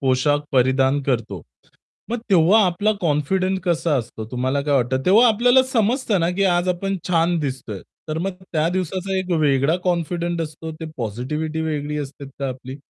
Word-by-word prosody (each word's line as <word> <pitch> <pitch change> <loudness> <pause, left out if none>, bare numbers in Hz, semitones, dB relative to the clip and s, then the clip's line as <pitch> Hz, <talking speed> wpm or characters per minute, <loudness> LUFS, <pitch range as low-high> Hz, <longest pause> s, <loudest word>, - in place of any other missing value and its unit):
पोशाख 135 +2 +2
परिधान 130 +2 +3
करतो. 115 - -2 0.7
मग 240 - -1
तेव्हा 190 +4 +5
आपला 205 +5 +1
कॉन्फिडंट 185 +5 0
कसा 170 -3 +1
असतो 115 -3 -5
तुम्हाला 130 +3 -1
काय 145 0 0
वाटतं? 130 +1 +1
तेव्हा 220 +7 +6
आपल्याला 245 +4 +4
समजतं 225 -3 +1
ना, 165 +1 +1
की 195 +2 0
आज 175 -1 +2
आपण 195 +2 -1
छान 170 0 +2
दिसतोय, 130 -8 -4 0.3
तर 155 - -2
मग 190 +4 -1 0.2
त्या 160 0 +1
दिवसाचा 185 +2 -2
एक 185 -1 -4
वेगळा 140 +3 +2
कॉन्फिडंट 170 -1 -1
असतो. 160 +1 -7
ते 160 +1 -8
पॉझिटिव्हिटी 135 +8 -3
वेगळी 150 -1 -2
असते 140 -1 -7
का 140 - -2
आपली? 130 +1 -7
160 Hz, 165 wpm, -21 LUFS, 135-185 Hz, 0.7 s, तेव्हा